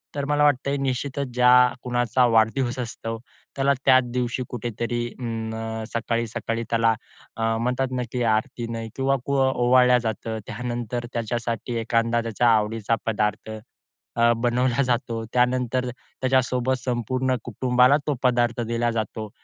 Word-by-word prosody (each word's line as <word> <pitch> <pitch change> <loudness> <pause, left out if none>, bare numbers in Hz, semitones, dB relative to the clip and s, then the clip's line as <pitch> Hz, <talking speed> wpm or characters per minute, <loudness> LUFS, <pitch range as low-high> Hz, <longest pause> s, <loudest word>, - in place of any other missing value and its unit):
तर 140 - -2
मला 150 +1 +2
वाटतंय 140 0 +2
निश्चितचं 135 +1 -2
ज्या 125 0 +5 0.3
कुणाचा 120 0 +2
वाढदिवस 120 +2 +2
असतो. 115 -1 -5 0.4
त्याला 140 0 +2
त्याच 130 -1 +6
दिवशी 125 0 -1
कुठेतरी 120 0 -3
अं, 110 -1 -4
सकाळी-सकाळी 115 0 -2
त्याला 115 -1 +3 0.4
अ, 115 0 0
म्हणतात 125 +3 -1
ना 125 -1 -1
की 125 -1 -1
आरतीनं 115 0 -1
किंवा 135 +1 +1
कु 140 0 0 0.2
ओवाळल्या 125 0 +4
जातं. 110 0 -4
त्यानंतर 120 0 -4
त्याच्यासाठी 115 +1 -3
एखादा 115 +1 +1
त्याच्या 115 +1 +1
आवडीचा 110 0 +1
पदार्थ 105 0 -1 0.7
अ, 115 0 +4
बनवला 125 +2 +1
जातो. 120 -2 -1
त्यानंतर 125 0 +1
त्याच्यासोबत 130 0 -1
संपूर्ण 130 +1 0
कुटुंबाला 125 +4 +3
तो 150 - +2
पदार्थ 120 -2 +2
दिला 120 0 0
जातो 110 -1 -4
120 Hz, 125 wpm, -24 LUFS, 115-125 Hz, 0.7 s, त्याच